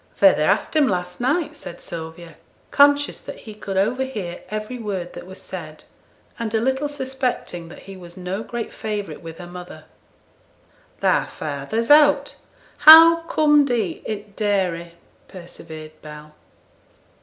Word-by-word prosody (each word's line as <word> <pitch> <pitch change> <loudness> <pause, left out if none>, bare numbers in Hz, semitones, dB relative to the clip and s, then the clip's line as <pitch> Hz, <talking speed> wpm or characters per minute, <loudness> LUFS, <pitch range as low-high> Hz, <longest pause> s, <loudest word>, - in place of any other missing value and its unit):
Feyther - - +5
asked - - +1
him 300 -3 +4
last 180 0 -3
night,' 300 +4 0
said 175 - -9
Sylvia, 165 0 -9 0.4
conscious 285 0 +3
that - - -9
he 215 - -10
could 200 -2 -6
overhear 215 -4 -2
every 215 +4 -5
word 195 -5 -5
that - - -10
was 190 +1 -11
said, - - -9 0.6
and 230 -1 -3
a - - +3
little 265 +5 -1
suspecting 260 -11 -4
that - - -12
he 195 - -10
was 175 -1 -12
no 185 +3 -4
great 235 0 -6
favourite 210 -2 -5
with 165 -1 -9
her 175 - -9
mother. 175 -3 -10 1.2
'Thy - - +2
feyther's 155 - -3
out; 295 0 +5 0.4
how 325 +2 +10
com'd 295 -3 +3
he 220 -9 -1
i' 215 - 0
t' 205 +1 -11
dairy?' 180 -5 -1 0.3
persevered 160 -3 -11
Bell. 150 0 -11
205 Hz, 145 wpm, -22 LUFS, 175-265 Hz, 1.2 s, how